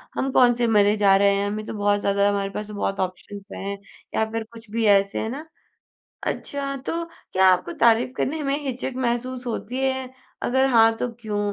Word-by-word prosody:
हम 270 Hz, 0 st, -1 dB
कौन 245 Hz, -2 st, +5 dB
से 240 Hz, -1 st, +1 dB
मरे 210 Hz, -2 st, +4 dB
जा 200 Hz, -2 st, +5 dB
रहे 200 Hz, 0 st, +4 dB
हैं। 200 Hz, 0 st, 0 dB
हमें 215 Hz, +1 st, -4 dB
तो -, -, -6 dB
बहुत 205 Hz, -1 st, +1 dB
ज़्यादा 200 Hz, 0 st, +2 dB
हमारे 200 Hz, -1 st, -1 dB
पास 210 Hz, +1 st, -5 dB
तो 210 Hz, -, -8 dB
बहुत 195 Hz, -1 st, -2 dB
ऑप्शंस 190 Hz, +2 st, -5 dB
हैं 200 Hz, +1 st, -5 dB, 0.4 s
या 220 Hz, -, +2 dB
फ़िर 225 Hz, 0 st, -2 dB
कुछ 225 Hz, -1 st, -13 dB
भी 230 Hz, 0 st, 0 dB
ऐसे। 200 Hz, -1 st, +3 dB
है 220 Hz, -, -3 dB
ना? 290 Hz, +6 st, -7 dB, 0.8 s
अच्छा 275 Hz, -1 st, -3 dB
तो 335 Hz, +1 st, -2 dB, 0.3 s
क्या 190 Hz, 0 st, +4 dB
आपको 180 Hz, -2 st, +2 dB
तारीफ़ 235 Hz, +1 st, +4 dB
करने 310 Hz, +3 st, -1 dB
में 275 Hz, 0 st, 0 dB
हिचक 265 Hz, 0 st, -3 dB
महसूस 250 Hz, 0 st, -2 dB
होती 235 Hz, +1 st, -4 dB
है, 265 Hz, -1 st, -1 dB, 0.3 s
अगर 265 Hz, +2 st, +2 dB
हाँ 225 Hz, -2 st, +5 dB
तो 250 Hz, -, -2 dB
क्यों? 215 Hz, -3 st, -3 dB
225 Hz, 205 wpm, -23 LUFS, 200-255 Hz, 0.8 s, कौन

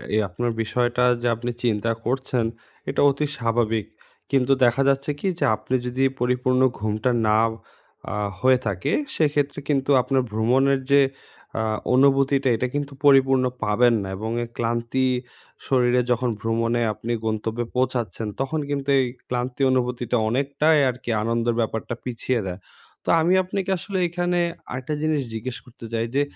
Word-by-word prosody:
এ -, -, +3 dB
আপনার 120 Hz, +7 st, -2 dB
বিষয়টা 120 Hz, +2 st, 0 dB, 0.2 s
যে, 120 Hz, -, 0 dB
আপনি 120 Hz, +2 st, -4 dB
চিন্তা 115 Hz, -1 st, +1 dB
করছেন, 130 Hz, -1 st, 0 dB, 0.4 s
এটা -, -, 0 dB
অতি 140 Hz, +2 st, -1 dB
স্বাভাবিক। 115 Hz, -3 st, 0 dB, 0.5 s
কিন্তু 135 Hz, -1 st, +2 dB
দেখা 120 Hz, +2 st, +4 dB
যাচ্ছে 140 Hz, +2 st, 0 dB
কি? 195 Hz, -, -2 dB
যে, -, -, +2 dB
আপনি 110 Hz, +4 st, -3 dB
যদি 125 Hz, +2 st, -1 dB, 0.2 s
পরিপূর্ণ 125 Hz, +1 st, +1 dB, 0.2 s
ঘুমটা 110 Hz, +3 st, 0 dB, 0.2 s
না 105 Hz, 0 st, +4 dB, 0.7 s
অ্যা -, -, -4 dB, 0.2 s
হয়ে 130 Hz, +2 st, +4 dB
থাকে, 95 Hz, -4 st, -1 dB, 0.2 s
সেক্ষেত্রে 145 Hz, -2 st, +1 dB
কিন্তু 135 Hz, -2 st, +1 dB
আপনার 130 Hz, +1 st, +1 dB
ভ্রমণের 130 Hz, +5 st, +2 dB
যে, 140 Hz, 0 st, +7 dB, 0.5 s
অ্যা 110 Hz, -, -1 dB, 0.3 s
অনুভুতিটা, 135 Hz, 0 st, +3 dB
এটা 125 Hz, +3 st, -1 dB
কিন্তু 145 Hz, -1 st, -3 dB
পরিপূর্ণ 135 Hz, -2 st, +5 dB, 0.2 s
পাবেন 115 Hz, +3 st, +3 dB
না। -, -, -5 dB
এবং 110 Hz, +3 st, -4 dB
এই 120 Hz, -, -7 dB
ক্লান্তি 120 Hz, +2 st, 0 dB, 0.6 s
শরীরে 125 Hz, -1 st, +3 dB
যখন 125 Hz, +1 st, +1 dB
ভ্রমণে 115 Hz, +1 st, 0 dB
আপনি 115 Hz, +3 st, -6 dB
গন্তব্যে 110 Hz, +2 st, -2 dB
পৌঁছাচ্ছেন, 125 Hz, -3 st, -1 dB
তখন 135 Hz, +4 st, -1 dB
কিন্তু 140 Hz, -1 st, -2 dB
এই 130 Hz, -, +2 dB, 0.2 s
ক্লান্তি 125 Hz, +1 st, -3 dB
অনুভূতিটা 125 Hz, -1 st, 0 dB
অনেকটাই 140 Hz, +5 st, +2 dB
আরকি 125 Hz, 0 st, -6 dB
আনন্দের 115 Hz, +1 st, 0 dB
ব্যাপারটা 115 Hz, 0 st, -2 dB
পিছিয়ে 125 Hz, 0 st, -2 dB
দেয়। 90 Hz, 0 st, -5 dB, 0.5 s
তো -, -, -3 dB
আমি 170 Hz, +3 st, +3 dB
আপনাকে 190 Hz, +1 st, -3 dB
আসলে 190 Hz, +2 st, -4 dB
এখানে 175 Hz, +1 st, -1 dB, 0.3 s
আরেকটা 130 Hz, +4 st, -4 dB
জিনিস 155 Hz, -2 st, +1 dB
জিজ্ঞেস 115 Hz, +2 st, -4 dB
করতে 120 Hz, -2 st, -13 dB
চাই, 115 Hz, 0 st, 0 dB
যে 140 Hz, -, +4 dB
125 Hz, 150 wpm, -23 LUFS, 115-135 Hz, 0.7 s, যে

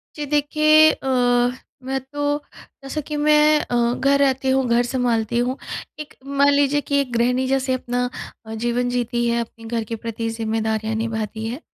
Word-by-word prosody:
जी। 295 Hz, -, -4 dB
देखिए 305 Hz, +2 st, +4 dB
अ, -, -, -7 dB, 0.8 s
मैं 265 Hz, +1 st, -2 dB
तो 290 Hz, +2 st, -2 dB, 0.5 s
जैसा 300 Hz, +3 st, -4 dB
कि 300 Hz, -, -4 dB
मैं 300 Hz, 0 st, +4 dB
अ, 240 Hz, 0 st, 0 dB
घर 275 Hz, +2 st, +2 dB
रहती 270 Hz, -1 st, +1 dB
हूँ, 265 Hz, 0 st, +2 dB
घर 235 Hz, +1 st, +3 dB
सँभालती 235 Hz, -2 st, 0 dB
हूँ। 255 Hz, +2 st, -1 dB, 0.4 s
एक 300 Hz, -, -8 dB
मान 280 Hz, +1 st, +3 dB
लीजिए 285 Hz, +1 st, +2 dB
कि 280 Hz, 0 st, 0 dB
एक 255 Hz, -3 st, -5 dB
गृहिणी 250 Hz, +2 st, +1 dB
जैसे 265 Hz, 0 st, 0 dB
अपना 245 Hz, 0 st, -2 dB, 0.4 s
अ, 220 Hz, -, -7 dB
जीवन 240 Hz, +2 st, -1 dB
जीती 240 Hz, -1 st, -1 dB
है, 235 Hz, 0 st, +1 dB
अपने 225 Hz, 0 st, -10 dB
घर 230 Hz, 0 st, -2 dB
के 230 Hz, +1 st, -5 dB
प्रति 230 Hz, 0 st, -4 dB
जिम्मेदारियाँ 220 Hz, -1 st, -2 dB
निभाती 220 Hz, -1 st, -3 dB
है, 250 Hz, +8 st, -5 dB
250 Hz, 175 wpm, -21 LUFS, 230-280 Hz, 0.8 s, देखिए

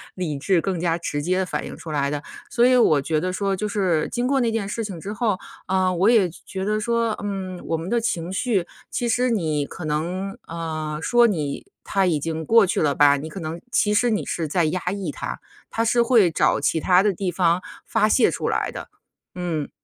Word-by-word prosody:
理 160 Hz, -6 st, -3 dB
智 180 Hz, +5 st, +2 dB
更 190 Hz, -2 st, -2 dB
加 165 Hz, -1 st, +1 dB
直 145 Hz, -3 st, -3 dB
接 180 Hz, +5 st, 0 dB
地 190 Hz, -, +1 dB
反 -, -, -3 dB
应 -, -, -8 dB
出 160 Hz, -, -8 dB
来 140 Hz, -2 st, 0 dB
的。 145 Hz, 0 st, -3 dB, 0.3 s
所 240 Hz, 0 st, +3 dB
以 255 Hz, 0 st, +5 dB
我 155 Hz, -, +4 dB
觉 155 Hz, +3 st, 0 dB
得 185 Hz, +4 st, -2 dB
说 195 Hz, +1 st, 0 dB
就 210 Hz, -, -2 dB
是， 185 Hz, -6 st, +1 dB
经 240 Hz, 0 st, -1 dB
过 270 Hz, +1 st, +2 dB
那 235 Hz, -3 st, +2 dB
件 220 Hz, -3 st, -2 dB
事 225 Hz, +1 st, -3 dB
情 190 Hz, -5 st, -6 dB
之 200 Hz, -, -5 dB
后， 215 Hz, -4 st, 0 dB, 0.3 s
啊， 185 Hz, -1 st, +2 dB
我 185 Hz, +4 st, +3 dB
也 215 Hz, -6 st, +4 dB
觉 190 Hz, +3 st, -7 dB
得 215 Hz, +1 st, 0 dB
说， 230 Hz, +1 st, 0 dB
嗯， 190 Hz, -3 st, -4 dB
我 165 Hz, -, -1 dB
们 165 Hz, +3 st, -5 dB
的 235 Hz, +1 st, +2 dB
情 175 Hz, -6 st, -2 dB
绪， 195 Hz, -3 st, 0 dB, 0.2 s
其 240 Hz, -, -2 dB
实 250 Hz, +2 st, +2 dB
你 160 Hz, -10 st, 0 dB
可 170 Hz, -, -9 dB
能， 175 Hz, +6 st, -2 dB
呃， 155 Hz, -2 st, -4 dB
说 240 Hz, +7 st, +4 dB
你 155 Hz, -9 st, -2 dB, 0.2 s
它 195 Hz, -1 st, +1 dB
已 160 Hz, -4 st, +1 dB
经 160 Hz, +2 st, -3 dB
过 225 Hz, +2 st, +6 dB
去 180 Hz, -, 0 dB
了 145 Hz, -2 st, +2 dB
吧， 145 Hz, -1 st, +5 dB
你 150 Hz, +3 st, -6 dB
可 175 Hz, -, -7 dB
能 160 Hz, +1 st, -5 dB
其 210 Hz, -2 st, +2 dB
实 240 Hz, +3 st, +3 dB
你 215 Hz, -2 st, 0 dB
是 165 Hz, -2 st, -2 dB
在 170 Hz, +2 st, +1 dB
压 160 Hz, +4 st, 0 dB
抑 195 Hz, -5 st, -3 dB
它， -, -, -5 dB, 0.3 s
它 230 Hz, -, -1 dB
是 235 Hz, +1 st, +3 dB
会 230 Hz, -7 st, +4 dB
找 -, -, +2 dB
其 165 Hz, -, +1 dB
它 180 Hz, +3 st, +4 dB
的 205 Hz, -1 st, +2 dB
地 185 Hz, 0 st, -2 dB
方 175 Hz, -1 st, +2 dB, 0.2 s
发 215 Hz, -1 st, +2 dB
泄 240 Hz, -, +4 dB
出 -, -, -2 dB
来 -, -, -1 dB
的， -, -, -8 dB, 0.5 s
嗯。 170 Hz, -5 st, -3 dB
185 Hz, 245 characters per minute, -23 LUFS, 160-215 Hz, 0.5 s, 过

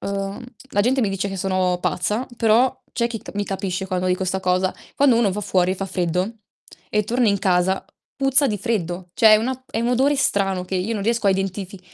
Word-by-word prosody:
uhm, 200 Hz, +3 st, -4 dB, 0.3 s
la 205 Hz, -, +2 dB
gente 260 Hz, +5 st, +2 dB
mi 220 Hz, -, +2 dB
dice 195 Hz, +1 st, -2 dB
che 195 Hz, -, -5 dB
sono 185 Hz, -1 st, 0 dB
pazza, 210 Hz, +8 st, -1 dB
però 245 Hz, +4 st, +3 dB
c'è 235 Hz, -1 st, 0 dB
chi 235 Hz, -1 st, -5 dB
t -, -, -10 dB
mi 205 Hz, 0 st, -1 dB
capisce 190 Hz, -1 st, -3 dB
quando 185 Hz, -1 st, -1 dB
dico 185 Hz, +1 st, 0 dB
'sta 190 Hz, +1 st, -1 dB
cosa: 185 Hz, 0 st, +1 dB, 0.2 s
quando 270 Hz, -4 st, +4 dB
uno 225 Hz, -4 st, +3 dB
va 210 Hz, -, -3 dB
fuori 185 Hz, -3 st, +1 dB
e -, -, -2 dB
fa 195 Hz, +1 st, -4 dB
freddo, 185 Hz, +4 st, -2 dB, 0.5 s
e 210 Hz, 0 st, +1 dB
torna 240 Hz, +2 st, +1 dB
in 200 Hz, -1 st, +2 dB
casa, 185 Hz, 0 st, +1 dB, 0.3 s
puzza 270 Hz, +1 st, +3 dB
di 210 Hz, -5 st, -1 dB
freddo. 180 Hz, -5 st, -3 dB
Cioè, 220 Hz, -1 st, +6 dB
è -, -, +7 dB
una 260 Hz, +3 st, -3 dB
è 225 Hz, -, -2 dB
un 235 Hz, -, 0 dB
odore 270 Hz, +4 st, +2 dB
strano, 195 Hz, -8 st, +1 dB
che 190 Hz, -, -5 dB
io 185 Hz, +5 st, -1 dB
non 200 Hz, -, -3 dB
riesco 230 Hz, 0 st, 0 dB
a 195 Hz, -, +6 dB
identifi 195 Hz, 0 st, -3 dB
200 Hz, 225 wpm, -22 LUFS, 185-230 Hz, 0.5 s, è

